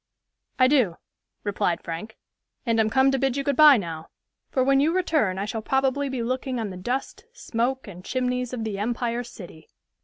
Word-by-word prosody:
"I 255 - +6
do," 250 - +2 0.5
replied 185 -4 -1
Frank, 170 +7 -6 0.5
"and 230 -2 +1
am 220 -1 +3
come 265 +4 +4
to 270 - 0
bid 270 0 0
you 275 - -1
good 280 0 0
by 300 -1 +8
now; 165 -5 -6 0.4
for 260 - +1
when 270 +1 +4
you 300 +4 +3
return 310 - +1
I 195 - -2
shall 220 +1 -4
probably 270 +3 0
be 255 -3 -3
looking 255 +1 -2
on 215 -3 -3
the - - -7
dust, 245 - -4
smoke 255 - -2
and 180 -2 -10
chimneys 250 0 -1
of 245 -3 -4
the 210 -3 -3
Empire 235 +2 -1
City." 175 -9 -12
245 Hz, 190 wpm, -25 LUFS, 210-265 Hz, 0.5 s, by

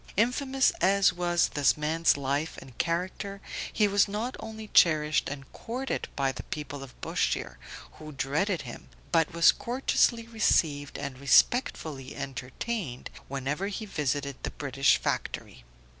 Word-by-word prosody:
Infamous 265 +4 +2
as 195 0 +4
was 175 -1 +1
this 145 0 +2
man's 155 +1 +2
life 140 +3 -2
and 130 -3 -12
character, 185 +3 -2 0.3
he 210 - +3
was 200 +1 +3
not 215 +5 -3
only 220 -1 -7
cherished 155 -2 +4
and 135 -1 -8
courted 255 +4 -4
by 135 -1 +1
the - - -7
people 145 -2 -6
of 135 -2 -11
Bushire, - - -1 0.4
who 155 0 -8
dreaded 155 +7 -1
him, 120 -3 -10 0.2
but 165 -1 +3
was 170 0 +6
courteously 240 -2 +1
received 155 -10 +1
and 140 -2 -6
respectfully 140 - +2
entertained 135 - -5 0.2
whenever 140 +7 -2
he 210 +2 -4
visited 145 -6 -2
the - - -3
British 140 -1 +2
Factory. - - -3
155 Hz, 135 wpm, -28 LUFS, 140-205 Hz, 0.4 s, was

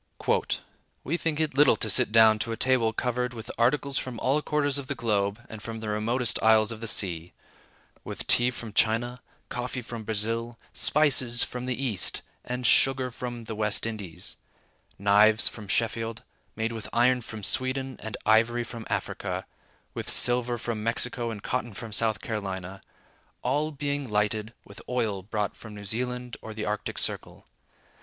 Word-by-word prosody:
"We 155 - -1
think 165 -3 -1
it 155 -3 0
little 140 0 +6
to 110 - 0
sit 105 - +5
down 110 -1 +6
to 115 +2 -2
a 115 - -3
table 125 -3 +3
covered 125 +1 -2
with 110 - -7
articles 135 +4 +2
from 125 -3 -6
all 140 +4 +2
quarters 145 -2 +1
of 135 - -7
the 140 - -2
globe 105 -3 0
and 110 -1 -9
from 115 0 -6
the 110 -1 -5
remotest 115 +3 0
isles 110 0 +5
of 115 -1 -7
the 115 - -4
sea—with 90 -5 -2
tea 120 +1 +4
from 120 -3 -7
China, 115 +3 +1 0.3
coffee 125 +1 -4
from 115 0 -7
Brazil, 115 +2 -1 0.2
spices 125 -1 +3
from 125 0 -5
the 125 -1 -2
East, 120 -9 0 0.2
and 125 0 -4
sugar 130 +1 +4
from 120 -1 -6
the 110 - -6
West 105 -1 +1
Indies; 105 -7 -6 0.6
knives 105 +3 +5
from 110 -3 -6
Sheffield, 115 +2 0 0.3
made 110 +1 -1
with 115 -2 -6
iron 125 +1 +3
from 110 -2 -8
Sweden 130 +2 +1
and 110 0 -5
ivory 115 +2 +4
from 115 -1 -8
Africa; - - -3 0.5
with - - -4
silver 120 0 +3
from 115 -2 -4
Mexico 120 +1 -1
and 105 -3 -7
cotton 120 -4 -2
from 115 +1 -7
South 110 -2 +1
Carolina; 95 -3 -4 0.6
all 145 +5 +1
being 145 -2 -2
lighted 105 +1 0
with 100 - -12
oil 110 -6 0
brought 105 +1 -2
from 110 -2 -11
New 100 0 -9
Zealand 125 +3 -3
or 110 -1 -8
the 110 - -3
Arctic 105 0 -3
Circle. - - -1
115 Hz, 165 wpm, -27 LUFS, 110-125 Hz, 0.6 s, little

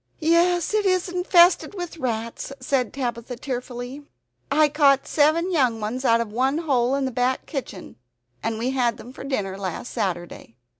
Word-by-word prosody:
"Yes, 340 +3 +2
it 430 -1 +2
is 370 0 +1
infested 360 +1 +4
with 350 -3 -6
rats," 230 -1 -3
said 255 -2 0
Tabitha 245 -2 -4
tearfully. 245 +1 -6 0.5
"I 300 +2 +4
caught 280 -2 +3
seven 320 +4 +2
young 255 -9 +2
ones 225 +5 -3
out 230 -3 +4
of 230 -2 -3
one 265 +5 +1
hole 270 -6 +1
in 275 -1 0
the 260 - -2
back 250 +2 0
kitchen, 225 - -7 0.4
and 225 -1 -2
we 245 +4 -1
had 245 -3 +1
them 250 - -11
for - - -9
dinner 200 -8 -3
last 190 +5 -5
Saturday. 175 - -4
260 Hz, 165 wpm, -23 LUFS, 235-310 Hz, 0.5 s, infested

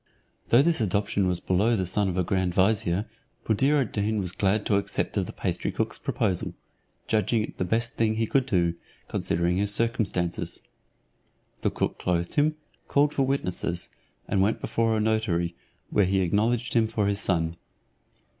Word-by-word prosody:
Though 120 +4 +6
this 165 -4 +2
adoption 100 -1 +1
was 90 -1 +1
below 100 +7 +2
the 95 -3 -1
son 100 +2 +1
of 90 - -3
a 90 - +2
grand 90 -1 -1
vizier, 95 -1 +2 0.4
Buddir 135 +7 +3
ad 130 - -1
Deen 105 +1 0
was 90 -3 -2
glad 100 +3 0
to 100 - +3
accept 100 - -2
of - - 0
the - - -6
pastry - - -2
cook's - - -2
proposal, 90 -3 -1 0.5
judging 110 +1 +1
it - - -8
the 95 - 0
best 115 +6 0
thing 110 -1 +2
he 115 +1 +1
could 135 +3 +1
do, 85 -7 +2 0.3
considering 85 +2 0
his 100 +1 +1
circumstances. 105 -6 -1 1.0
The - - +2
cook - - -2
clothed 85 -1 -1
him, 155 +1 +2 0.3
called 145 +1 +2
for - - 0
witnesses, 90 -9 -1 0.4
and 95 - +1
went 105 +3 +1
before 115 -1 0
a - - +1
notary, 105 -6 0 0.4
where 100 - +3
he 95 +1 +1
acknowledged 110 +6 +1
him 115 -2 +3
for 110 -2 -1
his 100 0 +1
son. 85 -4 +1
100 Hz, 175 wpm, -26 LUFS, 90-115 Hz, 1.0 s, Though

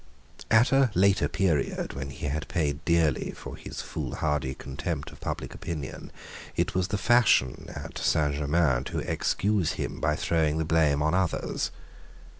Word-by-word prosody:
At 110 +4 +5
a 135 -1 +5
later 100 +2 +4
period, 85 -7 0
when 70 0 -5
he 70 +4 -7
had 75 +2 -2
paid 75 -2 -1
dearly 85 -5 +2
for - - -8
his - - -7
foolhardy 65 +2 -2
contempt 70 -1 -4
of - - -14
public - - -4
opinion, 75 -6 -6 0.4
it - - 0
was 90 0 +1
the 105 - -1
fashion 110 - +3
at - - -7
Saint 75 -2 +2
Germains 75 -3 +1
to - - -4
excuse 100 -4 0
him - - -4
by 75 0 +1
throwing 80 -1 +1
the 80 - 0
blame 75 -3 +3
on 80 +2 +1
others. 90 -2 0
80 Hz, 155 wpm, -27 LUFS, 70-90 Hz, 0.4 s, At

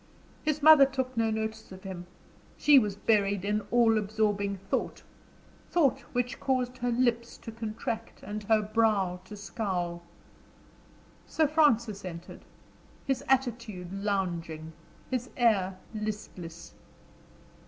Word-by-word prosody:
His 305 -1 -1
mother 305 -3 +9
took 260 -1 -3
no 225 -1 +2
notice 220 -1 -3
of 185 0 -11
him; 180 -2 -7 0.5
she 295 -2 +7
was 210 -5 -1
buried 200 -2 +1
in 210 +1 +1
all 230 -2 +4
absorbing 205 -1 0
thought - - -1 0.7
thought 275 -6 +3
which 245 0 -1
caused 255 -1 -1
her 245 0 0
lips 235 -1 0
to 225 - -9
contract, 225 0 -5
and 210 +1 -5
her 215 0 +3
brow 210 -4 +1
to 210 +2 -9
scowl. 180 -5 -3 1.3
Sir 320 - +2
Francis 235 - +2
entered, 170 -2 -8 0.6
his 270 -1 -1
attitude 235 -8 -1
lounging, 170 -6 -2 0.4
his 250 -1 -2
air 195 -6 +2 0.2
listless. 205 -6 -6
215 Hz, 120 wpm, -29 LUFS, 195-245 Hz, 1.3 s, mother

